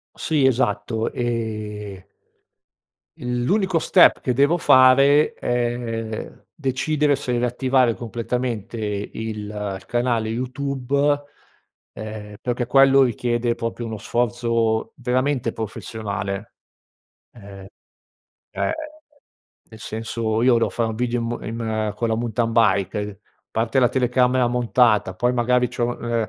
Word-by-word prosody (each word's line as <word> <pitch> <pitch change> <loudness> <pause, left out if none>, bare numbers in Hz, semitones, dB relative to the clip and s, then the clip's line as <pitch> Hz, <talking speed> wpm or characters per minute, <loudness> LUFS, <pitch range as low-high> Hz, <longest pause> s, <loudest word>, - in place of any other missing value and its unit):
Sì, 150 -5 +1
esatto 110 -3 0
ehm 105 -4 -4 1.1
l'unico 150 - 0
step 175 +2 +5
che 125 - 0
devo 140 +7 +3
fare 135 +1 +5
è 120 -2 -3 0.2
decidere 145 +1 +1
se 130 -2 -4
riattivare 125 0 +2
completamente 120 -1 -4
il 105 -2 -3
il 105 -3 -5
canale 120 -2 0
YouTube, 140 +3 -1 0.7
ehm, 105 -1 -8
perché 120 0 -2
quello 135 +1 +6
richiede 120 -1 0
proprio 115 +1 -4
uno 110 -1 -5
sforzo 115 -2 0
veramente 130 -1 0
professionale, 105 -2 -5 0.8
ehm, 100 -3 -12 0.9
ehm, - - -1 1.0
nel 110 - -12
senso 110 0 -2
io 125 0 +5
devo 115 -3 +1
fare 115 +4 -1
un - - -5
video 120 0 -1 0.2
in 115 - -5
m 115 - -4 0.3
in - - -3
con 115 - -1
la 110 - 0
mountain 115 0 -1
bike, 105 -3 +2
uhm, 105 -1 -5 0.3
parte 115 +3 0
la 125 -1 +4
telecamera 125 0 +2
montata 120 -5 +2
poi, 120 +6 0
magari, 125 +1 +2
c'ho, 120 0 -2
ehm, 115 -2 -1
120 Hz, 115 wpm, -22 LUFS, 110-125 Hz, 1.1 s, quello